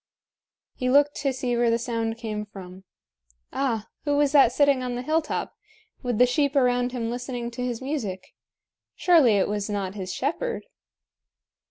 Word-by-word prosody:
He 255 - -2
looked 290 +2 +4
to 275 -2 0
see 250 -2 -2
where 235 0 +2
the 230 - +3
sound 230 -2 -2
came 215 -2 -4
from. 190 -1 -11 0.7
Ah! 230 -6 -1 0.2
who 290 -1 +1
was 290 -1 +3
that 275 -5 +6
sitting 280 0 +3
on 250 -1 -3
the 245 - -4
hilltop, 315 +2 -1 0.5
with 245 -4 -2
the 250 - +6
sheep 280 +3 +1
around 245 -2 +2
him 235 -2 -3
listening 245 -1 -4
to 250 +1 -5
his 245 0 -3
music? 220 -10 -4 0.6
Surely 320 -11 +5
it 195 - +2
was 205 0 -2
not 195 -2 -2
his 190 -3 -5
shepherd? 340 - -2
245 Hz, 165 wpm, -25 LUFS, 225-275 Hz, 0.7 s, that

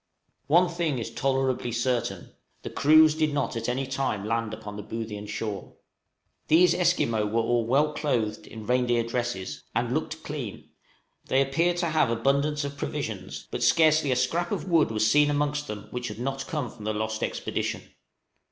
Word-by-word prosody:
One 175 +5 +5
thing 170 -5 -1
is 115 - -4
tolerably 135 -2 0
certain 120 +1 -2 0.3
the - - -6
crews 155 +1 +6
did 155 -2 0
not 140 -3 -1
at 115 +1 -2
any 130 +2 -1
time 130 -6 -2
land 115 0 -1
upon 110 -1 -7
the 105 - -5
Boothian 105 -1 -6
shore. 105 -2 -5 0.7
These 175 +3 +6
Esquimaux 115 -12 +1
were 115 +2 +1
all 115 0 +1
well 145 +5 +3
clothed 120 -9 -1
in 110 -1 -9
reindeer 120 0 +2
dresses, 115 -9 -3
and 120 +1 0
looked 155 +1 -3
clean; 140 -9 -6 0.5
they 135 - +2
appeared 165 +6 +2
to 175 -1 0
have 155 -5 +2
abundance 140 +5 +1
of 140 0 -5
provisions, - - -5
but - - -3
scarcely 155 -3 +4
a - - +3
scrap 165 +8 0
of - - -3
wood 165 -7 +4
was 110 -1 +1
seen 150 +5 +5
amongst 145 0 0
them 105 -1 -6
which 125 0 -4
had 105 - -6
not 135 +2 -3
come 150 -9 -3
from 110 - -12
the 110 - 0
lost 110 +1 -2
expedition. - - -2
130 Hz, 175 wpm, -27 LUFS, 115-150 Hz, 0.7 s, crews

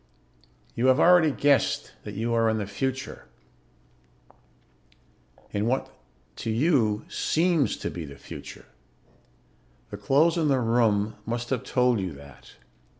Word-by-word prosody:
"You 120 +3 0
have 130 +2 +4
already 175 -2 +6
guessed 140 0 +1
that - - -7
you 115 +3 -2
are 115 -1 +3
in 110 - 0
the 105 - -2
future 130 +6 -4 2.2
in 105 +2 -1
what, 130 +2 -1 0.4
to - - -4
you, 115 -4 +1
seems 165 -3 +1
to - - -4
be 85 - -6
the 70 -1 -11
future. - - -10 1.3
The 100 - -6
clothes 145 - +2
and 155 -2 +1
the 135 -2 +2
room 110 -3 +1
must 120 +3 -4
have 130 - -1
told 125 -3 +1
you 95 -4 -4
that. 70 -2 -15
120 Hz, 135 wpm, -26 LUFS, 105-135 Hz, 2.2 s, already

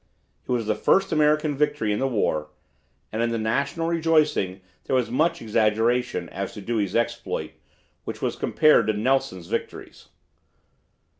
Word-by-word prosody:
It - - -4
was 120 -3 0
the 110 - +1
first 195 0 +2
American 150 -1 +2
victory 140 -7 0
in 105 - -2
the 135 - +1
war, 80 - -1 0.6
and 110 - -2
in 115 - +1
the 115 - -1
national 140 +9 -1
rejoicing 155 - +1 0.2
there - - 0
was 125 -3 0
much 155 +4 +1
exaggeration 110 -2 +1
as 100 0 -5
to 105 - -7
Dewey's 105 -3 -2
exploit, 115 -9 -2 0.5
which - - -6
was - - -2
compared 155 -8 +3
to 110 - +2
Nelson's 110 -5 0
victories! - - -6
115 Hz, 150 wpm, -24 LUFS, 105-150 Hz, 0.6 s, compared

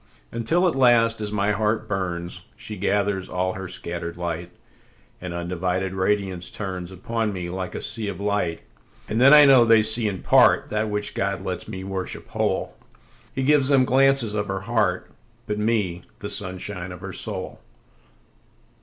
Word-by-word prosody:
Until 160 +11 +1
at 175 - +1
last, 120 -4 +3
as 105 -1 -4
my 105 0 +1
heart 110 +1 0
burns, 90 -3 -4
She - - -6
gathers 100 -2 -1
all 95 +1 -1
her 95 0 -6
scatter'd 85 -1 -5
light, 85 0 -4 0.7
And 90 -1 -5
undivided 90 +2 -2
radiance 95 -2 -1
turnsUpon 95 +3 -4
me 90 -3 -5
like 95 0 -5
a - - -4
sea 110 -1 -1
of 100 -3 -5
light. 100 -5 -1 0.4
And 110 - -1
then 135 +2 +8
I 150 -1 +9
know 135 -3 +7
they 115 -1 +5
see 110 +1 +5
in 95 -3 -4
partThat 105 0 +3
which 105 0 -1
God 100 -2 -2
lets 90 - -4
me 95 0 -6
worship 95 -1 -4
whole:He 135 - -5
gives 145 -1 +4
them 135 -2 +4
glances 135 -3 +3
of 105 -1 -2
her 95 -1 -3
heart, 115 +4 -1 0.3
But 105 0 -3
me, 105 -6 0 0.2
the 100 0 -6
sunshine 95 -1 -3
of 90 0 -10
her 95 -2 -7
soul. - - -3
100 Hz, 160 wpm, -23 LUFS, 90-115 Hz, 0.7 s, I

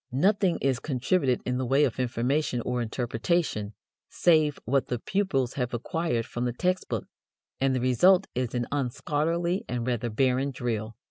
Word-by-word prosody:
Nothing 190 - +2
is 135 -2 +2
contributed 135 0 0
in 125 0 -1
the 130 - -1
way 135 +4 +4
of 130 -3 0
information 125 +2 0
or 125 +1 -2
interpretation 115 - -1 0.3
save 155 -4 +3
what 135 +3 +1
the 125 - -1
pupils 135 - 0
have 125 -3 -2
acquired 120 -1 -1
from 120 +1 -3
the 120 - -1
text 185 +8 -1
book, - - -2 0.5
and 135 -1 +2
the - - +1
result 180 +10 +4
is 125 -1 -2
an 120 -1 0
unscholarly 155 +6 -1
and 120 -1 -2
rather 120 -1 -1
barren 130 +4 +1
drill. 115 -4 -3
130 Hz, 160 wpm, -27 LUFS, 120-155 Hz, 0.5 s, way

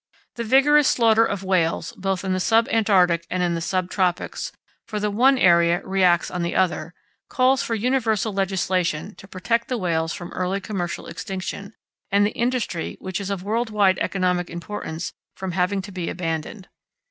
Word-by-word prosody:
The 235 - -4
vigorous 275 +5 +5
slaughter 225 -2 +4
of 195 -4 -2
whales 170 -3 0
both 195 0 -2
in 190 - 0
the 185 - 0
sub 225 +4 +3
Antarctic 180 -6 +3
and 180 0 -1
in 175 -1 +1
the 165 - -2
sub 185 +1 -1
tropics, 180 -3 -1 0.4
for 210 - -3
the 210 0 -1
one 260 +6 +4
area 170 -4 +4
reacts 185 -3 +2
on 180 - -3
the 170 - -2
other, 175 -2 0 0.3
calls 260 +1 +3
for 230 - -2
universal 225 -3 0
legislation 190 -2 -1
to 195 - -14
protect 200 +5 -1
the 250 - -1
whales 165 -4 -1
from 175 0 -7
early 185 +2 -2
commercial 190 -4 -4
extinction, 200 +1 -6 0.4
and 200 +1 +4
the 210 - 0
industry, 235 -9 -2
which 190 +1 -4
is 195 - -4
of 195 -2 -3
world 225 +3 -1
wide 200 -3 +3
economic 180 -2 0
importance, 170 -1 -6 0.2
from 190 -1 -4
having 190 +2 0
to 200 - -9
be 180 -3 -4
abandoned. 170 +3 -4
190 Hz, 175 wpm, -23 LUFS, 180-220 Hz, 0.4 s, vigorous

